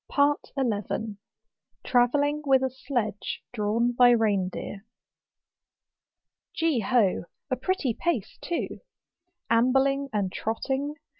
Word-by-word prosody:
11. 220 -3 -2 0.7
Travelling 285 +4 +2
with 265 -2 +4
a 260 - 0
Sledge 255 -5 -3
drawn 230 +2 +1
hy 245 -1 +8
Rein 210 -6 +3
deer. 195 +1 -7 1.7
Gee 320 -6 +1
ho! 215 -5 +2 0.3
a - - +3
pretty 270 -1 -1
pace 305 - -2
too. 345 - -3 0.7
Ambling 270 +4 +3
and 200 -3 -1
trotting. 270 +8 -2
245 Hz, 95 wpm, -27 LUFS, 215-275 Hz, 1.7 s, hy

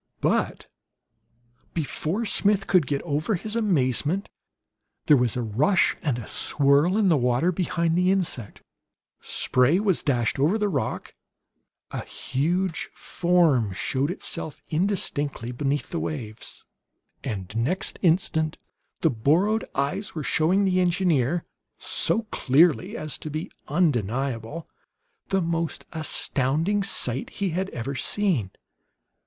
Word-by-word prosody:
But - - 0 1.1
before 165 +6 -2
Smith 200 -1 +2
could 180 -7 +3
get 140 -1 -1
over 155 +6 0
his 215 +5 -4
amazement 170 - +1 0.8
there 150 - +6
was 125 -2 +1
a 125 - -1
rush 130 - +2
and 140 -8 0
a 120 - -6
swirl 145 - +3
in 215 -3 +3
the 170 - +5
water 125 +7 +2
behind 170 -2 0
the 180 +1 +3
insect. 175 - -1 0.6
Spray 130 +8 +2
was 200 -4 +2
dashed 120 -3 0
over 160 +10 +3
the 210 -1 0
rock, 140 -8 -3 0.8
a - - -4
huge 165 +7 -1
form 165 - +2
showed 135 +8 -1
itself 165 -4 -4
indistinctly 155 - -1
beneath 140 +3 -2
the 170 - -2
waves, 115 -10 -6 0.6
and 100 -1 -5
next 140 +12 -1
instant 160 -3 +1 0.4
the - - +3
borrowed 165 - +2
eyes 145 +10 -2
were 155 - -3
showing 175 +8 +2
the 185 -1 +2
engineer, 175 -4 +1 0.3
so 230 - +2
clearly 170 - +3
as 155 -1 -4
to 155 - -6
be 155 +3 -5 0.2
undeniable, 135 - -1 0.6
the 195 -2 +1
most 165 -1 -2
astounding 160 +4 0
sight 130 -10 -1
he 200 -2 -2
had 190 +4 -2
ever 125 -1 -4
seen. 145 - 0
160 Hz, 125 wpm, -25 LUFS, 135-185 Hz, 1.1 s, there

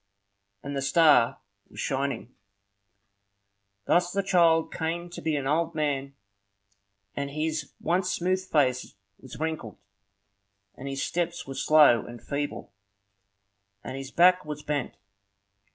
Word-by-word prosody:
And 140 0 -5
the 135 - -1
star 140 -4 +4 0.3
was - - -12
shining. 135 -2 -2 1.5
Thus 175 0 +2
the 200 +1 -1
child 170 -4 +3
came 170 +1 -3
to - - -8
be 160 -2 0
an 140 -2 -2
old 165 +3 0
man, 140 -3 -2 1.0
and 140 0 -3
his 155 0 -3
once 180 +1 0
smooth 185 +2 0
face 130 -7 +1 0.2
was 130 - -11
wrinkled, 155 -8 -4 1.0
and 135 - -9
his 135 0 -3
steps 175 0 -2
were 135 - -7
slow 145 -6 +5
and 120 0 -10
feeble, 145 -7 -5 1.1
and - - -6
his 135 0 -6
back 180 +3 +5
was 150 0 -7
bent. 145 -4 -3
150 Hz, 125 wpm, -27 LUFS, 135-170 Hz, 1.5 s, slow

